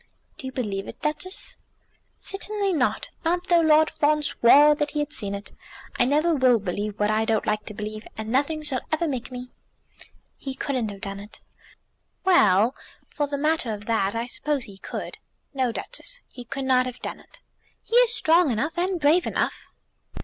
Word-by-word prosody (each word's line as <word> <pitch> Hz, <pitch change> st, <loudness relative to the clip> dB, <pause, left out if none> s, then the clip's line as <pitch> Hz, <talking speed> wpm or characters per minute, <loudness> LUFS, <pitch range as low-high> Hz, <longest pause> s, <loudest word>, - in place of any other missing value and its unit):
"Do 265 Hz, -, -6 dB
you -, -, -5 dB
believe 205 Hz, -7 st, -3 dB
it, -, -, -9 dB
Duchess?" 310 Hz, +5 st, -3 dB, 0.6 s
"Certainly 400 Hz, 0 st, -1 dB
not; 265 Hz, -6 st, 0 dB
not 350 Hz, +2 st, 0 dB
though 345 Hz, -1 st, +6 dB
Lord 315 Hz, -1 st, +5 dB
Fawn 300 Hz, +1 st, +2 dB
swore 290 Hz, +3 st, +6 dB
that 295 Hz, 0 st, -1 dB
he 300 Hz, -, -2 dB
had 295 Hz, -, -2 dB
seen 200 Hz, -2 st, -4 dB
it. 200 Hz, +1 st, -8 dB, 0.5 s
I 245 Hz, -, +5 dB
never 305 Hz, +6 st, +2 dB
will 255 Hz, -4 st, +4 dB
believe 205 Hz, +1 st, -4 dB
what 210 Hz, 0 st, +2 dB
I 215 Hz, +1 st, +2 dB
don't 220 Hz, -1 st, +1 dB
like 215 Hz, -1 st, -1 dB
to 210 Hz, -, -7 dB
believe, 215 Hz, +1 st, -6 dB
and 220 Hz, 0 st, -4 dB
nothing 290 Hz, +4 st, +1 dB
shall 270 Hz, -4 st, 0 dB
ever 315 Hz, +2 st, +1 dB
make 260 Hz, -5 st, -3 dB
me." 250 Hz, 0 st, -7 dB, 0.9 s
"He 270 Hz, -1 st, -5 dB
couldn't 255 Hz, -6 st, -1 dB
have 200 Hz, -1 st, -9 dB
done 195 Hz, -1 st, -4 dB
it." 205 Hz, +1 st, -11 dB, 0.9 s
"Well; 225 Hz, -, +5 dB, 0.4 s
for 290 Hz, -1 st, 0 dB
the 285 Hz, 0 st, -3 dB
matter 305 Hz, -4 st, +1 dB
of 210 Hz, -1 st, -6 dB
that, 215 Hz, -2 st, 0 dB
I 230 Hz, +1 st, -1 dB
suppose 280 Hz, +2 st, -2 dB
he 195 Hz, -3 st, -12 dB
could." -, -, -6 dB, 0.3 s
"No, 260 Hz, -3 st, +1 dB
Duchess, -, -, -6 dB
he 245 Hz, -, -10 dB
could 275 Hz, +2 st, -4 dB
not 255 Hz, -1 st, +3 dB
have 250 Hz, 0 st, -6 dB
done -, -, -4 dB
it." -, -, -17 dB, 0.4 s
"He 460 Hz, -, -3 dB
is -, -, +6 dB
strong 335 Hz, -6 st, +4 dB
enough, 270 Hz, +8 st, -1 dB
and 365 Hz, 0 st, 0 dB
brave 315 Hz, +4 st, +4 dB
enough." -, -, -2 dB
265 Hz, 185 wpm, -25 LUFS, 220-310 Hz, 0.9 s, though